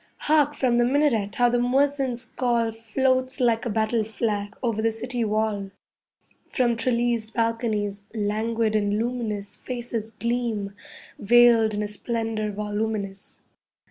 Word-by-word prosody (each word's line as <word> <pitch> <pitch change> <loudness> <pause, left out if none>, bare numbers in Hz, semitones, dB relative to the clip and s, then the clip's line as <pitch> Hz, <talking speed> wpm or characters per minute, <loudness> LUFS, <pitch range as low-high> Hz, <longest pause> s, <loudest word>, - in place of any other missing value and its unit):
Hark, 295 -1 +3
from 245 -3 +2
the 240 - +4
minaret, 240 -7 +1
how 245 - +4
the 245 0 +1
muezzin's 260 -1 +1
call 235 -3 0
Floats 255 +4 0
like 240 -1 +2
a - - -1
battle 220 +1 +1
flag 210 -2 -3
over 225 -3 0
the 225 0 +2
city 245 +2 -2
wall. 215 -2 -1 0.8
From 240 -3 +1
trellised 235 -1 0
balconies, 225 -3 -1
languid 220 +1 0
and 205 -1 +1
luminous 220 -4 -3
Faces 240 -3 -4
gleam, 225 -3 -2 0.5
veiled 230 -1 +5
in 210 - -1
a - - -2
splendour 220 0 -3
voluminous. 205 -1 -4
225 Hz, 130 wpm, -25 LUFS, 215-245 Hz, 0.8 s, veiled